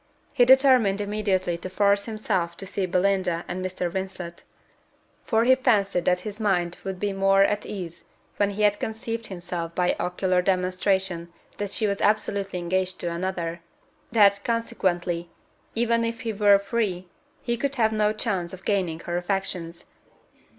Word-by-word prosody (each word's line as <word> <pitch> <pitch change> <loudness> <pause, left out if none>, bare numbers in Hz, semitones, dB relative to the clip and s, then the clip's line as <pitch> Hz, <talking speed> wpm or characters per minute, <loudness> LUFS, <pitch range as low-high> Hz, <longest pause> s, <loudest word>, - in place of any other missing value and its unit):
He 250 -4 +5
determined 255 -6 +5
immediately 200 -4 -1
to 185 - -6
force 200 +1 +2
himself 200 -6 -2
to 195 - -3
see 190 0 -2
Belinda 180 -1 +1
and 185 +1 -4
Mr. 185 -1 -2
Vincent; 185 -2 -5 0.8
for 225 0 +2
he 255 +2 +6
fancied 205 -9 +2
that 180 0 +2
his 210 +2 -7
mind 180 -5 0
would 190 -1 -5
be 205 0 -1
more 195 0 +4
at 205 +1 0
ease 180 -5 -7 0.3
when 205 -1 +2
he 205 +1 -2
had 205 0 +3
convinced 225 0 -4
himself 175 -2 -5
by 180 -1 +2
ocular 180 +1 +1
demonstration 185 -1 0 0.3
that 205 -1 -3
she 215 - -1
was 200 -1 -1
absolutely 200 -2 +1
engaged 185 +1 -1
to 170 - -2
another; 170 -1 -3 0.5
that, 200 -3 +5
consequently, 180 -7 -1 0.5
even 230 0 +2
if 230 0 -3
he 225 -1 -2
were 205 -1 +5
free, 200 -3 -2 0.4
he 235 - 0
could 275 +3 -2
have 220 -3 +2
no 210 -1 +2
chance 195 -6 -2
of 185 0 -10
gaining 180 -6 0
her 175 0 -3
affections. 175 -2 -3
195 Hz, 155 wpm, -25 LUFS, 180-215 Hz, 0.8 s, he